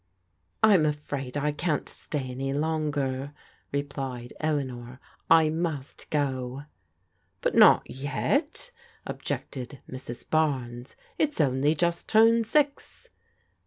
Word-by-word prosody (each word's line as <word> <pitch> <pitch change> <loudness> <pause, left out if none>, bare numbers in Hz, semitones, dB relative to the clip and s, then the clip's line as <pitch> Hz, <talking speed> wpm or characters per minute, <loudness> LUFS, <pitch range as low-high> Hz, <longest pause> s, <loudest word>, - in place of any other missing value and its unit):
" 85 +1 -45
I'm 200 -7 +6
afraid 145 -3 -3
I 150 +1 +1
can't 150 0 -1
stay 135 -4 -3
any 135 +2 -3
longer," 145 -3 -1 0.4
replied 135 -4 -4
Eleanor. 130 -5 -2
" - - -34
I 160 -1 +6
must 160 -4 -3
go." 135 -2 -1 0.4
" - - -45
But - - +1
not - - +7
yet," 275 - 0 0.3
objected 130 +1 -5
Mrs. 130 -2 -7
Barnes. 130 -6 -1
'* - - -33
It's 300 -1 +1
only 145 +1 +3
just 170 +1 0
turned 225 +1 +5
six." 295 - 0
145 Hz, 120 wpm, -27 LUFS, 130-160 Hz, 0.4 s, not